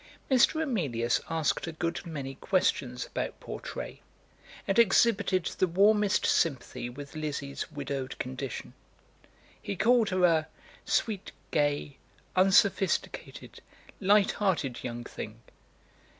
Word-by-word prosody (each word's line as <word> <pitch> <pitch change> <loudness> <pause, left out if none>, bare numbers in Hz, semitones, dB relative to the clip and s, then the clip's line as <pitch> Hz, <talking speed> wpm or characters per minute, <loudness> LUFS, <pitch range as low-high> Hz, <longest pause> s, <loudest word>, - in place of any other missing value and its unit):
Mr. 265 +5 +5
Emilius 140 - 0
asked 160 0 0
a - - -3
good 165 +1 -3
many 140 -5 -5
questions 130 -6 0
about - - -4
Portray, - - -7 0.7
and 195 +3 +2
exhibited 200 -4 +4
the 185 - +4
warmest 205 +3 +3
sympathy 135 -5 0
with 140 +4 -10
Lizzie's 145 -2 -4
widowed 140 -2 -4
condition. 130 0 -5 0.9
He 200 - -4
called 230 +2 +4
her 185 -1 +3
a 160 -2 +3 0.4
"sweet, 210 -4 -1 0.2
gay, 145 -1 0 0.4
unsophisticated, 195 +1 +1 0.4
light 200 0 +4
hearted 165 - -1
young 120 -1 -4
thing." - - -8
165 Hz, 105 wpm, -29 LUFS, 140-200 Hz, 0.9 s, Mr